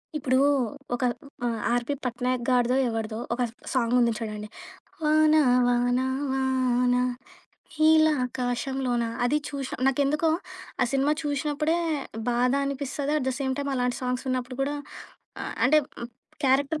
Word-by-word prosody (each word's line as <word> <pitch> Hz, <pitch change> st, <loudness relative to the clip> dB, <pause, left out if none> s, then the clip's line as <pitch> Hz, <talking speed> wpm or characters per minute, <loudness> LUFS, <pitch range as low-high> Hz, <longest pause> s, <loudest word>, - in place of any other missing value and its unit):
ఇప్పుడు 260 Hz, -3 st, +1 dB, 0.6 s
ఒక 245 Hz, -, -4 dB, 0.4 s
ఆ! -, -, +2 dB, 0.2 s
'ఆర్.పి. 240 Hz, +3 st, 0 dB
పట్నాయక్' 250 Hz, 0 st, -1 dB
గాడిదో, 250 Hz, 0 st, +3 dB
ఎవడిదో 225 Hz, -1 st, -3 dB, 0.2 s
ఒక 245 Hz, -, -2 dB, 0.3 s
సాంగ్ 245 Hz, -2 st, +1 dB
ఉంది 235 Hz, -1 st, +3 dB
చూడండి. 215 Hz, -2 st, -5 dB, 0.6 s
వాన 310 Hz, 0 st, +4 dB, 0.3 s
వాన 245 Hz, 0 st, +2 dB, 0.3 s
వానా, 250 Hz, -2 st, +2 dB, 0.7 s
హీలాకాశంలోనా 265 Hz, -5 st, +2 dB, 0.2 s
అది 280 Hz, +5 st, +2 dB
చూషి 275 Hz, -2 st, -5 dB
నాకెందుకో, 285 Hz, +4 st, +2 dB, 0.5 s
ఆ -, -, +5 dB
cinema 275 Hz, +2 st, +2 dB
చూషి 290 Hz, 0 st, -2 dB
నప్పుడే, 305 Hz, +3 st, +1 dB, 0.5 s
బాధనిపిస్తది. 275 Hz, +3 st, 0 dB
At 260 Hz, -, -4 dB
the -, -, 0 dB
same 265 Hz, -1 st, 0 dB
time 280 Hz, 0 st, -2 dB
అలాంటి 250 Hz, -1 st, 0 dB
సాంగ్స్ 250 Hz, +1 st, -2 dB
విన్నప్పుడు 255 Hz, 0 st, -3 dB
కూడా 290 Hz, +2 st, -1 dB, 0.6 s
అ -, -, -4 dB, 0.2 s
అంటే, 300 Hz, +5 st, +6 dB, 0.7 s
క్యారెక్టర్ 280 Hz, +4 st, +2 dB
260 Hz, 120 wpm, -26 LUFS, 245-285 Hz, 0.7 s, అంటే